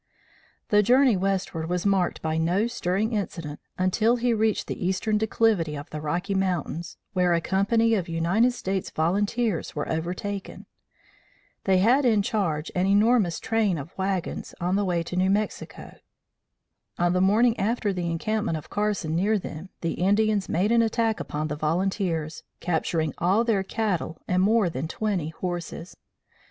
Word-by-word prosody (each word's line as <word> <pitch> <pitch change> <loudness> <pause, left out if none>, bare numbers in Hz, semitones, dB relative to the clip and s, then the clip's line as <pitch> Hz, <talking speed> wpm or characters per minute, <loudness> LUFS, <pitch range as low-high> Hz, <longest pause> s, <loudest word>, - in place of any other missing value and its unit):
The 210 0 +5
journey 250 +2 +4
westward 185 -4 -1
was 180 +1 -1
marked 195 -3 +1
by 160 0 0
no 180 +6 +2
stirring 220 -1 -1
incident 165 -8 -4 0.2
until 215 +6 +2
he 245 0 +1
reached 220 -1 +1
the - - -5
eastern 190 +4 0
declivity 215 -8 +1
of 145 +3 -8
the 150 - -5
Rocky 175 +6 -2
Mountains, 175 -3 -2 0.2
where 180 -2 +3
a - - +2
company 225 +6 +2
of 190 -5 -1
United 175 +9 +2
States 190 -5 -3
Volunteers 205 +4 0
were 150 - -2
overtaken. 180 +5 -4 1.0
They 190 -1 +4
had 240 +9 +4
in 220 -5 +3
charge 170 -8 -1
an 180 +1 +1
enormous 205 -3 +3
train 220 -6 +1
of 145 +4 -8
wagons 190 -2 -3
on 180 +2 0
the 205 - +1
way 175 -2 0
to 180 - -6
New 185 +1 +2
Mexico. 210 +2 -3 1.0
On 175 0 +2
the 180 - +2
morning 225 +5 +4
after 210 -1 0
the 175 -2 -2
encampment 210 +2 -1
of 155 - -11
Carson 205 -6 -1
near 205 +5 +2
them, 180 -1 -7
the 165 - -1
Indians 205 0 +2
made 190 +6 +1
an 235 0 +5
attack 225 -1 +1
upon 155 +1 -3
the 150 - -3
volunteers, 165 0 -1 0.2
capturing 160 -3 -1
all 190 +7 +3
their 225 -5 +1
cattle 190 -6 -2
and 180 0 +2
more 215 0 +3
than 160 -2 -3
twenty 195 -5 -2
horses. 175 +1 -5
190 Hz, 160 wpm, -25 LUFS, 170-215 Hz, 1.0 s, The